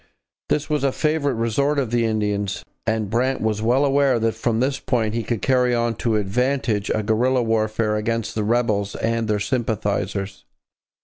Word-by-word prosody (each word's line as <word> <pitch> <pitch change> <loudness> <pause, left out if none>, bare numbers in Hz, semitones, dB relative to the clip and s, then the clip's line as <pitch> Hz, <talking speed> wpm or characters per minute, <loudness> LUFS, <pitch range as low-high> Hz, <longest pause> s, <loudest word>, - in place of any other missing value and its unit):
This 150 - 0
was 150 -3 -1
a 135 - +2
favourite 150 -2 0
resort 130 +6 +1
of 130 -5 -1
the 120 -1 +2
Indians, 105 -3 -1 0.2
and 110 -2 0
Brant 130 +3 +1
was 110 -1 -1
well 125 +5 +3
aware 140 -2 +3
that 115 0 +1
from 115 -2 -1
this 135 +2 0
point 110 -4 0
he 115 - -1
could 115 0 -3
carry 125 -2 +3
on 120 0 +1
to 115 -2 0
advantage 110 +1 0
a 110 - 0
guerrilla 125 +4 +2
warfare 110 -1 0
against 115 +1 -2
the 110 - -1
rebels 105 -3 0
and 115 0 -1
their 105 -1 +1
sympathizers. 100 - -2
115 Hz, 175 wpm, -22 LUFS, 105-130 Hz, 0.2 s, well